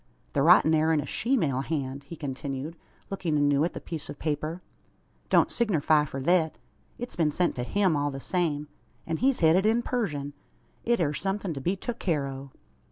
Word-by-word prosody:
"The 140 Hz, -, +2 dB
writin' 160 Hz, 0 st, +6 dB
air 160 Hz, +1 st, +3 dB
in 160 Hz, -, +3 dB
a 145 Hz, -, -2 dB
sheemale 165 Hz, -, 0 dB
hand," 140 Hz, -2 st, -3 dB
he 170 Hz, -, -8 dB
continued, 140 Hz, +1 st, -5 dB, 0.4 s
looking 170 Hz, -6 st, -1 dB
anew 145 Hz, 0 st, +3 dB
at 170 Hz, -, -1 dB
the -, -, -5 dB
piece 160 Hz, -3 st, -6 dB
of -, -, -7 dB
paper. 155 Hz, +3 st, -3 dB, 0.7 s
"Don't -, -, +4 dB
signerfy 155 Hz, -, +2 dB
for 135 Hz, -, -5 dB
thet. 160 Hz, +2 st, +2 dB, 0.4 s
It's 245 Hz, +1 st, -6 dB
been 160 Hz, -3 st, +2 dB
sent 175 Hz, +4 st, +1 dB
to 125 Hz, -, -1 dB
him 190 Hz, +4 st, +2 dB
all 145 Hz, 0 st, 0 dB
the 135 Hz, -1 st, -6 dB
same; 150 Hz, -2 st, -1 dB, 0.4 s
an 165 Hz, -1 st, -2 dB
he's 265 Hz, +1 st, +1 dB
hed 160 Hz, 0 st, +6 dB
it 190 Hz, +2 st, +3 dB
in 230 Hz, +2 st, +2 dB
purzeshun. 150 Hz, -, -2 dB, 0.5 s
It 235 Hz, -2 st, +2 dB
air 150 Hz, -4 st, +1 dB
somethin' 195 Hz, +4 st, -2 dB
to 135 Hz, -, -6 dB
be 180 Hz, +8 st, 0 dB
tuk 235 Hz, +4 st, -5 dB
care 155 Hz, -7 st, 0 dB
o'." 135 Hz, 0 st, -7 dB
155 Hz, 195 wpm, -27 LUFS, 145-185 Hz, 0.7 s, writin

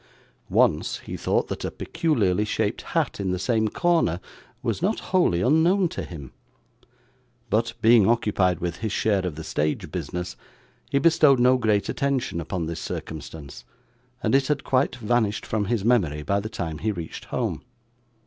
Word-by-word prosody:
Once, -, -, +2 dB
he -, -, -7 dB
thought -, -, 0 dB
that -, -, -5 dB
a -, -, -1 dB
peculiarly 105 Hz, -, 0 dB
shaped 105 Hz, -, -1 dB, 0.2 s
hat -, -, 0 dB
in 95 Hz, -2 st, -1 dB
the 90 Hz, -, 0 dB
same 110 Hz, +3 st, +1 dB
corner 165 Hz, -, +1 dB, 0.4 s
was -, -, -1 dB
not 200 Hz, +5 st, +1 dB
wholly 175 Hz, -, +3 dB
unknown 170 Hz, -, +3 dB
to -, -, -5 dB
him; 75 Hz, -7 st, -9 dB, 1.2 s
but, 115 Hz, +2 st, +1 dB
being 115 Hz, -3 st, +6 dB
occupied 100 Hz, -6 st, +2 dB
with 85 Hz, -1 st, -3 dB
his 110 Hz, -1 st, -3 dB
share 100 Hz, -2 st, +1 dB
of 90 Hz, -5 st, -3 dB
the 80 Hz, -, -7 dB
stage 75 Hz, 0 st, -2 dB
business, 90 Hz, 0 st, -4 dB, 0.5 s
he -, -, +1 dB
bestowed 155 Hz, -3 st, +5 dB
no 125 Hz, +1 st, +5 dB
great 110 Hz, -5 st, +1 dB
attention 130 Hz, -10 st, -1 dB
upon 85 Hz, +1 st, -3 dB
this 80 Hz, 0 st, -4 dB
circumstance, 80 Hz, -2 st, -7 dB, 0.6 s
and -, -, +1 dB
it 135 Hz, -1 st, +3 dB
had 145 Hz, -2 st, 0 dB
quite 130 Hz, -1 st, +1 dB
vanished 110 Hz, -3 st, 0 dB
from 110 Hz, -2 st, -1 dB
his 110 Hz, -2 st, -1 dB
memory 85 Hz, -12 st, +2 dB
by 100 Hz, +5 st, +1 dB
the 110 Hz, +2 st, -5 dB
time 80 Hz, -8 st, -4 dB
he 110 Hz, -, 0 dB
reached 85 Hz, -5 st, -7 dB
home. -, -, -2 dB
105 Hz, 165 wpm, -25 LUFS, 90-130 Hz, 1.2 s, being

